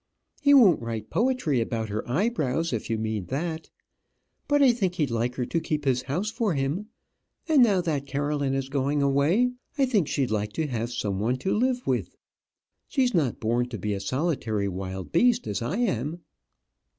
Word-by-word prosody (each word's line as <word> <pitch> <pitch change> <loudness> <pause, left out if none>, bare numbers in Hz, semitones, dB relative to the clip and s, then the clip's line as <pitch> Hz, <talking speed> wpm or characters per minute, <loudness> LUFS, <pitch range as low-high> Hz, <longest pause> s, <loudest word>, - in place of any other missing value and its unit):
He 285 0 +6
won't 205 - +6
write 115 -2 -5
poetry 230 - +1
about 115 -1 -2
her 105 +1 -2
eyebrows, 165 - 0
if 115 - -3
you 115 - 0
mean 110 -3 -2
that. 160 +4 -3 0.8
But 290 -1 +4
I 260 - +7
think 190 -6 -1
he'd 150 -7 0
like 120 +2 -1
her 125 - -1
to 165 - -1
keep 150 -2 -3
his 130 -2 +2
house 165 +11 -2
for 220 - 0
him; 145 +10 -2 0.6
and 310 -5 +5
now 205 -6 +4
that 145 -5 -2
Caroline 145 -1 -1
is 135 -1 -2
going 140 +1 0
away, 150 - +3 0.3
I 275 - +4
think 210 - +1
she'd 135 -5 -1
like 105 -1 -1
to 160 - -1
have 120 -4 -3
some 100 -5 -2
one 120 +5 0
to 190 - +2
live 250 +2 0
with. - - -2 0.7
She's 255 -4 +1
not 150 - +1
born 120 +2 0
to 115 - -5
be 105 +2 -2
a 100 - -3
solitary 115 - -1
wild 95 0 -5
beast 240 +7 +3
as 105 0 -3
I 140 - -2
am." 170 - -1
140 Hz, 185 wpm, -26 LUFS, 115-190 Hz, 0.8 s, I